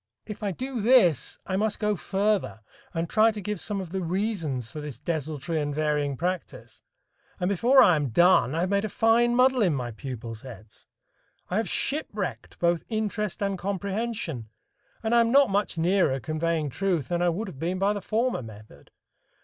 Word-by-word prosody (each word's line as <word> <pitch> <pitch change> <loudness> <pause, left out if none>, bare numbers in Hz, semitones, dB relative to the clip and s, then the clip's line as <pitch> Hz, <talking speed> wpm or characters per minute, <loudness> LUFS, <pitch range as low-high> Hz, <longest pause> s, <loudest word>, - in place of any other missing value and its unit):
If 210 - -8
I 205 -2 -1
do 255 +4 -4
this, 210 - +4
I 190 - -1
must 215 +1 0
go 210 -1 0
further 200 - -1 0.3
and 165 -1 -2
try 215 +5 +4
to 215 - -7
give 210 0 -4
some 205 +1 -3
of 185 -3 -6
the 190 0 -2
reasons 170 - -2
for 150 - -6
this 150 -4 -7
desultory 155 +2 -3
and 145 -1 -3
varying 150 -2 0
practice, 180 +2 -4 0.6
and 180 - 0
before 235 +8 +5
I 180 - +5
am 145 -3 -1
done, 160 0 +4
I 165 - 0
have 180 - 0
made 200 0 +2
a 215 - -2
fine 235 +3 +3
muddle 255 0 +4
in 180 -8 +3
my 125 -2 -3
pupils' 115 -2 -7
heads! 110 -5 -13 0.6
I 185 - +1
have 225 - 0
shipwrecked 215 - -3
both 170 -1 +1
interest 215 -2 -2
and 195 -2 -1
comprehension, 195 - -3 0.5
and 220 +1 0
I 235 - +6
am 230 0 +2
not 275 -4 +5
much 200 -3 0
nearer 170 -5 +2
conveying 155 0 -1
truth 175 -5 -1
than 175 0 0
I 175 - +3
would 200 +6 -3
have 150 -8 -9
been 175 +4 -1
by 200 +2 +2
the 205 - -4
former 230 - 0
method. 110 - -13
185 Hz, 190 wpm, -26 LUFS, 150-210 Hz, 0.6 s, I